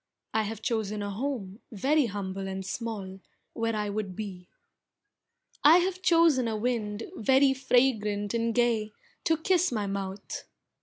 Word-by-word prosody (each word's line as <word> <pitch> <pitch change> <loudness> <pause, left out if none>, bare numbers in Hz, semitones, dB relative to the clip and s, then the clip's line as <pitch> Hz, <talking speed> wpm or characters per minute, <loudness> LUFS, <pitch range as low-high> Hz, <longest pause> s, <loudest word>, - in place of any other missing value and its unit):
I 220 - +3
have 220 0 -5
chosen 215 -3 -1
a 205 - -3
home 215 -3 -4
very 270 +6 +2
humble 195 -2 -4
and 190 0 -4
small, 200 -4 -5 0.3
Where 230 -1 -1
I 210 -1 -1
would 200 -3 -3
be. 185 -4 -7 1.2
I 310 +4 +9
have 365 +1 0
chosen 330 -8 +4
a 220 -1 -1
wind 215 -2 -2
very 265 +4 +4
fragrant 225 -6 +1
and 230 -1 0
gay, 230 -3 +1 0.3
To 325 -1 +3
kiss 360 +1 +2
my 215 -4 -1
mouth. 195 0 -5
220 Hz, 145 wpm, -28 LUFS, 205-260 Hz, 1.2 s, I